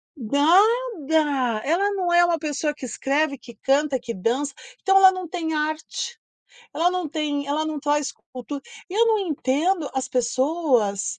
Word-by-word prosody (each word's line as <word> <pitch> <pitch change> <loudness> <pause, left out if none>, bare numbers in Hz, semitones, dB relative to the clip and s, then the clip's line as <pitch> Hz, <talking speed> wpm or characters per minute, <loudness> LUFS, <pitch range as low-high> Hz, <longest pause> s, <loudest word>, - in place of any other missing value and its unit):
nada! 300 - +2
Ela 375 +7 +1
não 365 -3 -1
é 345 0 +6
uma 340 -1 +1
pessoa 300 0 -2
que 280 - -8
escreve, 280 +4 0
que 235 -2 -14
canta, 275 +2 +1
que 235 -1 -6
dança, 255 +9 -1 0.3
então 390 0 +4
ela 380 -1 +8
não 370 -2 -5
tem 325 -2 -3
arte, 310 +10 -3 0.6
ela 345 +2 +2
não 365 -4 -2
tem 290 -2 -2
ela 300 +2 -1
não 310 -1 -3
traz 295 0 0 0.2
cultura. 265 +3 -6 0.3
E - - -6
eu 460 +2 +4
não 440 -1 +3
entendo 315 0 0
as 265 -1 -1
pessoas 250 - 0
300 Hz, 160 wpm, -23 LUFS, 270-345 Hz, 0.6 s, ela